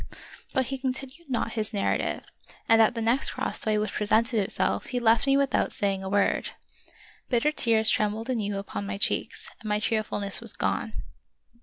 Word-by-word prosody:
But 260 - +1
he 270 +2 -4
continued 270 +4 -5
not 235 -2 -1
his 220 -1 -3
narrative, 200 - -1 0.4
and 225 0 +6
at 225 +3 +4
the 230 - -2
next 235 +4 +2
crossway 215 -1 -1
which 210 0 -1
presented 225 +3 +2
itself 195 - -1
he 250 - -2
left 230 +2 +3
me 275 0 +4
with 275 -2 +1
out - - +1
saying 195 -1 -1
a 190 - -4
word. 200 0 +1 0.7
Bitter 250 +4 +2
tears 225 -6 +3
trembled 215 +2 +1
anew 210 -6 -1
upon 200 0 -5
my 200 0 -3
cheeks, 200 - -1
and 215 - -7
my 210 0 +1
cheerfulness 210 -2 -2
was - - +5
gone. - - -2
225 Hz, 175 wpm, -27 LUFS, 210-255 Hz, 0.7 s, and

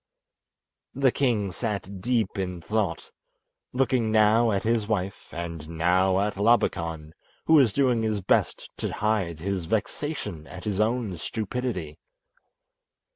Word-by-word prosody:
The 135 -1 +3
king 115 -9 0
sat 100 -2 -4
deep 115 -2 0
in 90 -2 -3
thought, 95 -2 -2 0.6
looking 125 -3 +1
now 110 +2 +4
at 100 -2 0
his 115 -2 +1
wife 100 -3 -3
and 85 -2 -6
now 90 +3 +2
at 105 -1 -1
Labakan, 85 -8 +1 0.3
who 160 - +3
was 135 -8 +6
doing 125 -2 +2
his 110 -2 0
best 95 - 0
to - - -3
hide 100 -7 -1
his 95 -1 -2
vexation 105 - -3
at 90 -1 -9
his 105 -2 -2
own 110 -4 0
stupidity. 110 -6 -4
105 Hz, 130 wpm, -26 LUFS, 90-115 Hz, 0.6 s, was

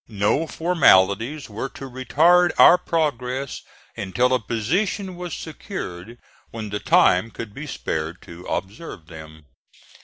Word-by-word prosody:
No 105 +9 0
formalities 135 - +2
were 115 +5 -5
to 135 - -7
retard 165 +8 +3
our 180 - +8
progress 135 -5 -2 0.3
until 120 +6 0
a 130 - +2
position 180 - -2
was 175 -1 -7
secured 120 - -7 0.3
when 110 -3 -7
the 105 - -2
time 90 +2 +3
could 115 -2 -8
be 145 +5 -8
spared 80 - -4
to 85 +1 -12
observe 100 - -6
them. 80 -1 -12
125 Hz, 125 wpm, -22 LUFS, 100-160 Hz, 0.3 s, our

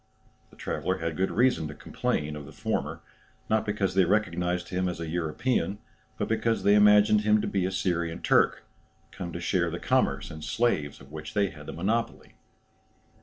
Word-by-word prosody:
The - - -19
traveller - - -2
had 80 0 -3
good 95 +3 0
reason 125 -9 +2
to 75 - -8
complain 75 0 -2
of 75 -2 -8
the - - -11
former, - - -3 0.5
not 110 0 +2
because 100 -3 0
they 95 0 +4
recognized 90 -2 0
him 90 0 0
as 90 - -5
a 85 - -4
European, 95 +7 -1 0.4
but - - -1
because 115 0 0
they 100 - +5
imagined 105 0 +6
him 105 0 +3
to - - -2
be 95 -2 0
a - - -3
Syrian 85 -3 -1
Turk, - - +3 0.5
come 90 -3 -6
to 85 - -5
share 85 0 +1
the 85 - -4
commerce - - 0
in 80 - -9
slaves 75 -5 0
of 70 +1 -15
which 75 0 -8
they 100 -2 +2
had 75 -2 -12
the - - -5
monopoly. 110 +7 -2
90 Hz, 185 wpm, -27 LUFS, 80-105 Hz, 0.5 s, imagined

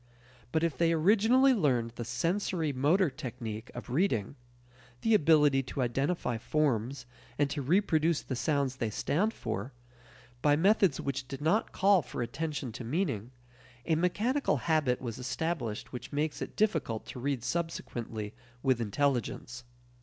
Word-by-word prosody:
But 160 0 +1
if 165 -5 -1
they 165 -1 +4
originally 220 +10 +5
learned 130 - +1
the 120 - -6
sensory 165 - -1
motor 150 +6 +3
technique 115 -4 -6
of 120 0 -7
reading 130 - +1 0.7
the 225 - +2
ability 150 -6 +5
to 130 0 -3
identify 125 0 -1
forms 130 -2 0 0.3
and 145 - +3
to 145 - -2
reproduce 165 +1 +2
the 130 - -4
sounds 135 0 0
they 115 - -1
stand 175 - 0
for 110 - -5 0.7
by 145 -1 +4
methods 190 -1 +3
which 135 -2 -3
did 135 0 -6
not 165 +9 +1
call 195 -1 +4
for 125 -2 -4
attention 145 +1 -4
to 125 +3 -7
meaning, 125 - -1 0.6
a 165 - +1
mechanical 205 - +1
habit 145 -3 +1
was 120 -1 -5
established 130 -5 -3
which 125 +2 -7
makes 150 +1 -1
it - - -5
difficult 160 - 0
to - - -8
read 135 -2 -2
subsequently 120 -10 -3 0.3
with 130 -3 +2
intelligence. 120 0 -1
145 Hz, 145 wpm, -30 LUFS, 125-165 Hz, 0.7 s, originally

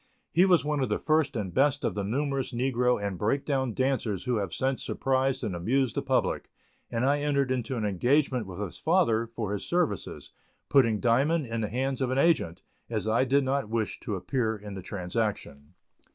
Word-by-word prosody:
He 175 +4 +5
was 175 -7 +4
one 150 -1 0
of 130 - 0
the - - +1
first 155 -3 +1
and 100 -5 -3
best 145 +1 +2
of - - 0
the 100 - -2
numerous 135 +5 -1
negro 125 -1 +1
and 100 -3 -3
"break 135 +7 0
down" 130 -5 -1
dancers 125 -8 0
who 125 -2 0
have 100 -4 -2
since 130 0 -1
surprised 130 0 0
and 95 - -2
amused 120 +7 +1
the - - -1
public, - - 0 0.4
and 115 +2 -1
I 145 +2 +3
entered 140 -2 +1
into 130 0 -2
an 110 - -1
engagement 125 - +1
with 95 0 -8
his 100 -5 -5
father 115 0 +2
for 110 -3 -4
his 100 - -3
services, 170 - -2 0.4
putting 115 -6 +4
Diamond 140 +8 +2
in 115 -1 -3
the 105 - -2
hands 130 +3 -2
of 130 - +1
an 130 - -1
agent, 135 - +2 0.3
as 110 -2 -2
I 115 +4 +3
did 140 +2 +3
not 135 -3 -1
wish 110 -2 -2
to 110 -5 -4
appear 110 +4 -1
in 105 0 -9
the 95 - -6
transaction. 90 -6 -4
125 Hz, 200 wpm, -28 LUFS, 105-135 Hz, 0.4 s, He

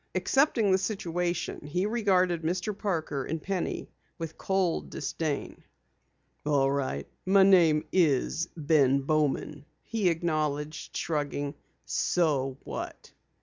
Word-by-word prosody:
Accepting 265 -7 +3
the 190 - +4
situation, 180 -6 -2
he 180 +6 0
regarded 190 -6 +2
Mr. 180 +5 -1
Parker 160 -9 -2
and 160 +4 -3
Penny 185 +2 -3 0.3
with 165 -1 -6
cold 190 -3 0
disdain. 150 0 -3 0.8
"All 140 -2 +2
right, 130 - -2 0.2
my 195 +1 +5
name 165 -5 +5
is 165 -1 +2
Ben 140 -3 +3
Bowman," 150 0 0 0.2
he 215 -5 +1
acknowledged, 155 -2 -2
shrugging. 145 -2 -2 0.3
"So 140 -6 +1
what?" - - -7
165 Hz, 105 wpm, -28 LUFS, 145-185 Hz, 0.8 s, my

